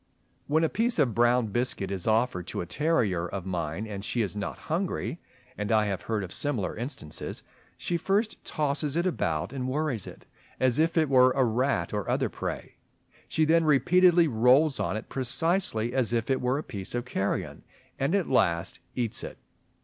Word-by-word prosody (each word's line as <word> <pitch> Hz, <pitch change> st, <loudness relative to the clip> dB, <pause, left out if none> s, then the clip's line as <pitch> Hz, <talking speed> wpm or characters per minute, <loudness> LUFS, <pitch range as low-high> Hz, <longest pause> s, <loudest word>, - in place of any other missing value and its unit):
When 155 Hz, +3 st, +2 dB
a -, -, +4 dB
piece 230 Hz, +7 st, +1 dB
of 135 Hz, -8 st, +2 dB
brown 120 Hz, 0 st, +3 dB
biscuit 110 Hz, -3 st, -1 dB
is 95 Hz, -1 st, -3 dB
offered 110 Hz, -5 st, +1 dB
to -, -, -3 dB
a -, -, -4 dB
terrier 105 Hz, -, 0 dB
of 95 Hz, 0 st, -5 dB
mine 90 Hz, +1 st, -3 dB
and 100 Hz, -2 st, -6 dB
she 115 Hz, +2 st, 0 dB
is 105 Hz, -, -4 dB
not 105 Hz, -1 st, -4 dB
hungry 165 Hz, -, -3 dB, 0.4 s
(and 105 Hz, +2 st, -2 dB
I 110 Hz, -1 st, +4 dB
have 100 Hz, -4 st, -2 dB
heard 110 Hz, 0 st, -2 dB
of 95 Hz, -, -7 dB
similar 135 Hz, -10 st, -2 dB
instances), 120 Hz, -, -5 dB, 0.3 s
she 175 Hz, -, -1 dB
first 205 Hz, +6 st, 0 dB
tosses 145 Hz, -1 st, -1 dB
it 170 Hz, +2 st, +1 dB
about 100 Hz, -, -1 dB
and 130 Hz, -2 st, -3 dB
worries 135 Hz, -5 st, -1 dB
it, -, -, -11 dB, 0.3 s
as 130 Hz, +1 st, +2 dB
if 165 Hz, +2 st, +2 dB
it 160 Hz, -1 st, +4 dB
were 130 Hz, -1 st, +5 dB
a 135 Hz, -, +3 dB
rat 120 Hz, -6 st, 0 dB
or 105 Hz, -3 st, -2 dB
other -, -, +1 dB
prey; -, -, -6 dB, 0.5 s
she 155 Hz, -, +1 dB
then 165 Hz, +1 st, +4 dB
repeatedly 170 Hz, +4 st, +5 dB
rolls 130 Hz, +3 st, +4 dB
on -, -, -1 dB
it 110 Hz, -, -7 dB
precisely 130 Hz, -, 0 dB
as 125 Hz, -3 st, +1 dB
if 115 Hz, +2 st, 0 dB
it 130 Hz, -, +1 dB
were 125 Hz, +2 st, +1 dB
a 150 Hz, -, -3 dB
piece 100 Hz, 0 st, -6 dB
of 120 Hz, 0 st, -2 dB
carrion, 100 Hz, -6 st, -2 dB, 0.4 s
and 140 Hz, +8 st, +1 dB
at 195 Hz, -4 st, +1 dB
last 85 Hz, -8 st, +1 dB, 0.2 s
eats 120 Hz, -4 st, -2 dB
it. -, -, -7 dB
125 Hz, 190 wpm, -28 LUFS, 105-155 Hz, 0.5 s, were